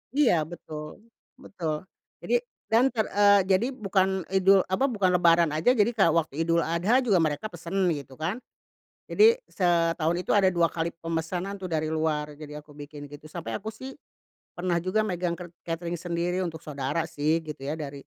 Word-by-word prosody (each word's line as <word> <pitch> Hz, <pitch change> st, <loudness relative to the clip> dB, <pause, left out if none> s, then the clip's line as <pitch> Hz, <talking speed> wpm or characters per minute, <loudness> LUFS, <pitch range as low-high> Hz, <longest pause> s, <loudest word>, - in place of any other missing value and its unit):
Iya, 290 Hz, -8 st, +4 dB
betul 155 Hz, +2 st, -9 dB, 0.3 s
betul. 170 Hz, -, -5 dB, 0.4 s
Jadi -, -, +1 dB, 0.4 s
dan 240 Hz, +4 st, +5 dB
ter 220 Hz, -3 st, 0 dB
eee, 200 Hz, 0 st, +6 dB
jadi 195 Hz, +6 st, +3 dB
bukan 190 Hz, -3 st, 0 dB
idul 190 Hz, 0 st, +5 dB
apa, 215 Hz, +9 st, +1 dB
bukan 200 Hz, -7 st, +1 dB
lebaran 170 Hz, -2 st, +4 dB
aja, 160 Hz, +11 st, +3 dB
jadi 210 Hz, -1 st, +4 dB
kayak 195 Hz, -6 st, +4 dB
waktu 160 Hz, -1 st, 0 dB
Idul 170 Hz, 0 st, +2 dB
Adha 180 Hz, +10 st, +2 dB
juga 200 Hz, -7 st, +3 dB
mereka 160 Hz, +6 st, 0 dB
pesen, 175 Hz, +2 st, -7 dB, 0.2 s
gitu 135 Hz, -2 st, -9 dB
kan. 180 Hz, +10 st, -2 dB, 0.7 s
Jadi 450 Hz, +3 st, +5 dB
setahun 170 Hz, -2 st, +1 dB
itu -, -, -1 dB
ada 190 Hz, -2 st, +5 dB
dua 170 Hz, -1 st, +3 dB
kali 165 Hz, 0 st, -2 dB
pemesanan 165 Hz, +4 st, -3 dB
tuh 185 Hz, -, -5 dB
dari 155 Hz, -1 st, 0 dB
luar, 155 Hz, -1 st, -1 dB
jadi 150 Hz, -1 st, -8 dB
aku 150 Hz, 0 st, -18 dB
bikin 145 Hz, 0 st, -9 dB
gitu. 145 Hz, +1 st, -12 dB
Sampai 170 Hz, -1 st, -6 dB
aku 215 Hz, +2 st, -7 dB
sih, 260 Hz, +5 st, -9 dB, 0.6 s
pernah 175 Hz, -1 st, 0 dB
juga 185 Hz, +4 st, +1 dB
megang 175 Hz, -3 st, -2 dB
kert 175 Hz, -1 st, -9 dB
katering 170 Hz, +1 st, -3 dB
sendiri 175 Hz, +1 st, -2 dB
untuk 165 Hz, -3 st, -4 dB
saudara 145 Hz, +2 st, -2 dB
sih, 155 Hz, +1 st, 0 dB
gitu 150 Hz, -2 st, -8 dB
ya, 145 Hz, +3 st, -2 dB
dari 140 Hz, -3 st, -7 dB
170 Hz, 175 wpm, -27 LUFS, 155-195 Hz, 0.7 s, eee